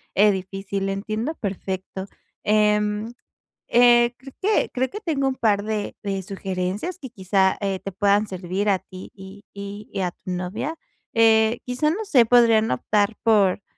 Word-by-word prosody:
eh, 210 Hz, +1 st, +6 dB
difícil, 195 Hz, +1 st, -4 dB
entiendo 215 Hz, +9 st, -3 dB
perfecto. 190 Hz, -2 st, -5 dB, 0.4 s
Em, 210 Hz, +1 st, +1 dB, 0.6 s
eh, 240 Hz, 0 st, +5 dB
creo 265 Hz, +1 st, -13 dB
que 420 Hz, +3 st, +1 dB
creo 260 Hz, +1 st, -1 dB
que 420 Hz, -, -7 dB
tengo 300 Hz, -9 st, -1 dB
un 265 Hz, -, -1 dB
par 210 Hz, -5 st, +1 dB
de 215 Hz, -1 st, -3 dB
de 195 Hz, -1 st, -2 dB
sugerencias, 190 Hz, -, -4 dB
y 265 Hz, -, -7 dB
quizá, 190 Hz, -3 st, +1 dB
eh, 195 Hz, -2 st, -2 dB
te 195 Hz, -, -6 dB
puedan 200 Hz, +2 st, +2 dB
servir 185 Hz, +2 st, -2 dB
a 195 Hz, -, +3 dB
ti 185 Hz, 0 st, -12 dB
y 195 Hz, +1 st, -12 dB
y 200 Hz, 0 st, -7 dB
a 180 Hz, -1 st, -1 dB
tu 185 Hz, -, -12 dB
novia. 180 Hz, -, -3 dB, 0.4 s
Eh, 225 Hz, 0 st, +4 dB
quizá 250 Hz, +5 st, 0 dB
no 415 Hz, +8 st, -2 dB
sé, 255 Hz, -, +5 dB
podrían 225 Hz, -2 st, +4 dB
optar 205 Hz, -, +1 dB
por 205 Hz, -4 st, +3 dB
210 Hz, 155 wpm, -23 LUFS, 195-235 Hz, 0.6 s, eh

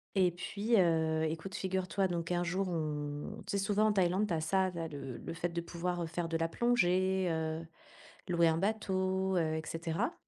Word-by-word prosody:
et 185 Hz, -2 st, +4 dB
puis, 205 Hz, +6 st, 0 dB
heu, 160 Hz, -2 st, +3 dB
écoute, 160 Hz, +5 st, -3 dB
figure-toi, 190 Hz, 0 st, 0 dB
donc 170 Hz, 0 st, -2 dB
un 175 Hz, 0 st, +1 dB
jour, 185 Hz, +2 st, -1 dB
on 150 Hz, -3 st, -3 dB
tu 200 Hz, -, -1 dB
sais 195 Hz, -, 0 dB
souvent 210 Hz, +1 st, +3 dB
en 215 Hz, -, +4 dB
Thaïlande, 190 Hz, +2 st, +2 dB
tu 170 Hz, -, 0 dB
as 160 Hz, -, -1 dB
ça 190 Hz, +3 st, +2 dB
là, 165 Hz, -2 st, -3 dB
le 135 Hz, -5 st, -6 dB
le -, -, -6 dB
fait 175 Hz, -, -1 dB
de 170 Hz, 0 st, -3 dB
pouvoir, 175 Hz, +1 st, -3 dB
heu, -, -, -2 dB
faire 165 Hz, 0 st, -3 dB
de 165 Hz, -, 0 dB
la 165 Hz, 0 st, 0 dB
plongée, 190 Hz, -4 st, +2 dB
heu, 160 Hz, 0 st, -2 dB, 0.6 s
louer 170 Hz, -1 st, +4 dB
un 160 Hz, 0 st, +3 dB
bateau, 190 Hz, -2 st, 0 dB
heu 160 Hz, -2 st, +1 dB
et 160 Hz, -, -1 dB
cetera. 165 Hz, 0 st, -2 dB
175 Hz, 205 wpm, -33 LUFS, 165-190 Hz, 0.6 s, et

